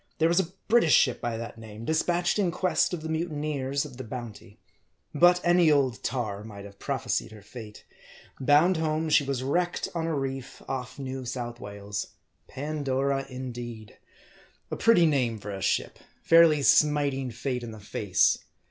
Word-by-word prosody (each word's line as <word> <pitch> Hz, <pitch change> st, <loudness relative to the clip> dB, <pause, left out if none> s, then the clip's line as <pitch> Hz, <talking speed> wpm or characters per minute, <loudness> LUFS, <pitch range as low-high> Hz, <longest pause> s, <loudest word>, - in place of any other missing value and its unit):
There 160 Hz, -, +3 dB
was 170 Hz, +2 st, +3 dB
a 180 Hz, -2 st, -1 dB, 0.2 s
British 225 Hz, -9 st, +5 dB
ship 125 Hz, -, +3 dB
by 120 Hz, -1 st, -2 dB
that 115 Hz, 0 st, -7 dB
name, 110 Hz, 0 st, -9 dB
dispatched 175 Hz, -, +1 dB
in 190 Hz, -4 st, +2 dB
quest 180 Hz, +1 st, +1 dB
of 170 Hz, -3 st, -4 dB
the -, -, -4 dB
mutineers 150 Hz, -4 st, -2 dB
of 135 Hz, -4 st, -11 dB
the 130 Hz, -, -6 dB
Bounty. 115 Hz, -4 st, -8 dB, 0.6 s
But 175 Hz, +4 st, +5 dB
any 175 Hz, -1 st, +4 dB
old 135 Hz, -5 st, +1 dB
tar 105 Hz, -5 st, -3 dB
might 100 Hz, -2 st, -10 dB
have 100 Hz, -1 st, -13 dB
prophesied -, -, -2 dB
her 105 Hz, -2 st, -13 dB
fate. 105 Hz, -1 st, -11 dB, 0.5 s
Bound 150 Hz, +7 st, +4 dB
home 160 Hz, 0 st, -1 dB
she 150 Hz, -, +5 dB
was 135 Hz, -2 st, -2 dB
wrecked 175 Hz, +6 st, -1 dB
on 165 Hz, -1 st, -2 dB
a 165 Hz, -, -1 dB
reef 135 Hz, -2 st, -4 dB
off 125 Hz, +1 st, -5 dB
New 130 Hz, -1 st, -5 dB
South 120 Hz, -1 st, -5 dB
Wales. 100 Hz, -1 st, -6 dB, 0.3 s
Pandora, 140 Hz, -1 st, -2 dB
indeed! 120 Hz, -4 st, -7 dB, 0.7 s
A -, -, -1 dB
pretty 225 Hz, -7 st, +5 dB
name 130 Hz, -7 st, +1 dB
for 105 Hz, 0 st, -7 dB
a 95 Hz, -1 st, -6 dB
ship: -, -, -1 dB, 0.2 s
fairly 165 Hz, -3 st, +6 dB
smiting 140 Hz, -3 st, +3 dB
Fate 125 Hz, +2 st, -3 dB
in 120 Hz, -, -7 dB
the 110 Hz, -1 st, -9 dB
face. 100 Hz, -2 st, +1 dB
135 Hz, 165 wpm, -27 LUFS, 115-160 Hz, 0.7 s, fairly